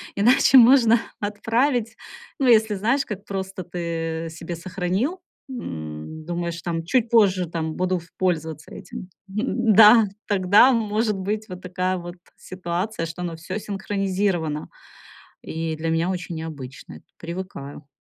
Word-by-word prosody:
иначе 255 +6 +5
можно 235 -2 +7 0.2
отправить. 225 +3 0 0.4
Ну, 270 - +2
если 220 -3 +5
знаешь, 235 +8 +1
как 205 -2 -6
просто 190 -2 -5
ты 165 -1 -4
себе 165 +1 -6
сохранил, 185 - -2 0.3
м, 80 - -7
думаешь 170 0 -3
там, 165 -1 -2
чуть 235 +3 +1
позже 195 -6 +4
там 160 -2 -3
буду 185 0 0
ф 170 -1 -11
пользоваться 160 -4 -2
этим. 185 -1 -9 0.2
Да! 220 0 +5 0.2
Тогда 205 +5 +5
может 215 -2 0
быть 210 +3 -3
вот 180 0 -8
такая 185 0 -2
вот 175 0 -8 0.2
ситуация, 185 +1 -4
что 170 +2 -7
оно 170 -2 -4
всё 165 +6 -5
синхронизировано. 195 -6 -2 0.7
И 160 0 -3
для 165 +1 -2
меня 165 +2 +1
очень 175 -2 -4
необычно 145 -5 -8
эт - - -30
Привыкаю. 165 -5 -7
185 Hz, 135 wpm, -23 LUFS, 165-215 Hz, 0.7 s, можно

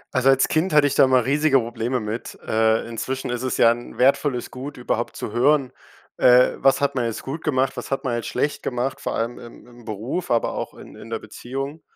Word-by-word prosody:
Also, 130 +1 +4
als 135 0 +4
Kind 160 +2 0
hatte 145 -1 +6
ich 145 - +1
da - - +6
immer 130 -2 +3
riesige 145 0 +3
Probleme 120 +2 -2
mit. 110 +2 -5
Äh, 110 0 +2
inzwischen 130 +3 -4
ist 125 0 -3
es, 130 -1 -2
ja, 115 - +6
'n 120 +1 -6
wertvolles 135 -1 +2
Gut, 135 +3 -7
überhaupt 120 -1 -2
zu - - -5
hören, 135 +3 +2 0.5
äh: 125 0 +6
„Was 135 - +3
hat 140 0 +1
man 125 -3 -1
jetzt 115 -2 -4
gut 150 +5 -6
gemacht, 135 -2 0
was 125 - -6
hat 135 - -2
man 130 - -1
jetzt 115 - -4
schlecht 145 - -1
gemacht“, 130 +2 -3
vor - - -3
allem 115 +2 -3
im 120 - -13
im 120 -1 -16
Beruf, 115 - -4
aber 115 -1 +1
auch - - -5
in - - -13
in - - -11
der 115 - -2
Beziehung. 135 +7 -7
130 Hz, 225 wpm, -23 LUFS, 120-135 Hz, 0.5 s, hatte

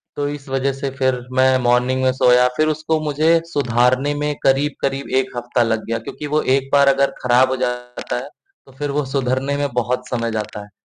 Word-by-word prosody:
तो 145 0 -2
इस 145 -1 -8
वजह 135 0 0
से 135 0 -4
फिर 130 -2 +1 0.2
मैं 130 0 +4
मॉर्निंग 125 +2 +2
में 130 - +3
सोया, 125 -1 +4
फिर 155 0 +2
उसको 155 +1 -1
मुझे 155 +3 +2
सुधारने 130 -1 +1
में 150 0 -1
करीब-करीब 135 0 0
1 130 - -8
हफ्ता 120 0 0
लग 110 -1 -1
गया 115 0 -1
क्योंकि 150 - -6
वो 155 - +3 0.2
1 135 0 -5
बार 140 -1 +5
अगर 140 0 +2
खराब 125 +1 +4
हो 130 - 0
जाता 125 0 -5
है, 135 +3 -6 0.4
तो 135 - -18
फिर 145 -1 -2
वो 145 -1 -1
सुधरने 135 +1 -1
में 145 0 0
बहुत 125 +1 -2
समय 115 -2 -2
जाता 105 -1 -5
है। 105 - -16
130 Hz, 205 wpm, -19 LUFS, 125-145 Hz, 0.4 s, बार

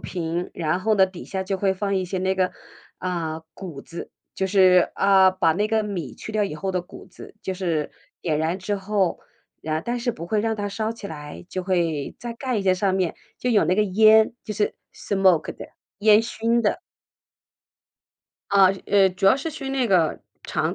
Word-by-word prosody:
平， 170 0 -3
然 165 +1 -1
后 215 +3 +2
呢， 195 -2 +6
底 185 -2 -9
下 190 -1 -3
就 190 0 -3
会 195 0 +1
放 200 +1 -1
一 185 -1 0
些 190 - -4
那 190 +1 0
个， 185 -1 0 0.4
啊， 165 -3 -3
谷 160 -5 -8
子， 170 - -8 0.2
就 190 - -1
是 185 -2 +5
啊， 190 -1 +5
把 185 -3 +2
那 205 +6 0
个 220 0 +2
米 185 -9 -5
去 220 - -8
掉 215 -1 +1
以 195 -6 -2
后 190 +5 -3
的 180 - 0
谷 175 - -13
子， - - -13
就 190 - -3
是 170 -5 -2 0.3
点 155 -3 0
燃 160 +4 -1
之 200 +2 -2
后 195 -2 0 0.4
啊， 155 0 -1
但 240 +7 -3
是 240 0 -1
不 170 -6 -8
会 210 +4 +1
让 225 +1 0
它 205 -1 -3
烧 215 +2 -2
起 230 -3 -9
来， 150 0 -9
就 185 - -4
会 170 -6 -1
再 240 0 -5
盖 255 0 -2
一 205 - -1
个 190 -1 +3
上 190 0 0
面 185 -3 0 0.2
就 250 - -1
有 210 -4 +4
那 180 - +2
个 215 - +3
烟， 215 +2 +5
就 215 - -5
是 210 0 0 0.2
smoke 190 -4 +2
的， - - -8 0.3
烟 215 +1 +6
熏 230 +1 0
的。 210 - 0 1.7
啊， 195 -1 +6 0.2
呃， 195 -1 +5
主 185 +2 -1
要 195 - +6
是 280 +4 -4
熏 270 -3 -6
那 265 -2 +1
个 180 -7 +2 0.2
肠 - - -1
190 Hz, 230 characters per minute, -23 LUFS, 180-210 Hz, 1.7 s, 呢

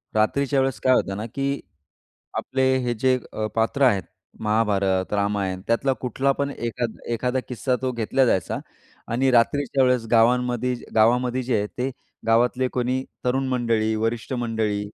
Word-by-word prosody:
रात्रीच्या 135 +6 +2
वेळेस 130 -4 0
काय 130 - +5
होतं 100 -5 0
ना, 105 - -4
की 140 +4 -2 0.8
आपले 130 - -1 0.2
हे 120 - 0
जे 130 +3 +2
अ, 110 - -2
पात्र 115 +5 +1
आहेत 100 -7 +3 0.4
महाभारत, 100 -3 +1
रामायण 100 -2 0
त्यातला 130 +4 +2
कुठला 130 +2 +1
पण 140 0 0
एखाद 120 -2 -3
एखादा 125 +2 0
किस्सा 125 +1 -1
तो 130 -1 0
घेतला 120 +3 +1
जायचा 95 -6 0 0.5
आणि 130 +3 +2
रात्रीच्या 130 +2 +3
वेळेस 125 -3 +2
गावांमध्ये 125 +1 +3 0.2
गावामध्ये 125 +3 +3
जे 120 -2 0
आहे 105 - -1
ते 130 +2 0 0.4
गावातले 125 +3 +3
कोणी 125 +1 0 0.2
तरुण 130 +2 +1
मंडळी, 115 -3 +1
वरिष्ठ 115 +3 -2
मंडळी 110 -4 -1
120 Hz, 150 wpm, -24 LUFS, 110-130 Hz, 0.8 s, काय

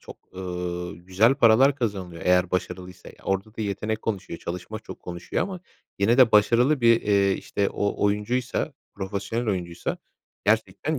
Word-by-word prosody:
çok, - - -11 0.2
ııı, 90 -1 -4
güzel 95 +8 +3
paralar 135 +2 +5
kazanılıyor 95 -9 -3
eğer 90 0 +3
başarılıysa. 90 0 -4
Ya, - - -14
orada 95 +3 -2
da - - -5
yetenek 105 +2 -2
konuşuyor, 100 -6 -4
çalışma 90 +5 -6
çok - - -11
konuşuyor 85 -1 -3
ama 190 -2 -5 0.4
yine 110 +6 +3
de 125 -3 +7
başarılı 120 +7 +4
bir, 115 -1 +5
eee, 100 -1 +3
işte, 100 +1 -1
o 100 0 -1
oyuncuysa, 115 +8 0 0.2
profesyonel 100 +4 -3
oyuncuysa 90 -4 -3 0.5
gerçekten 110 +7 +1
100 Hz, 150 wpm, -25 LUFS, 90-115 Hz, 0.5 s, de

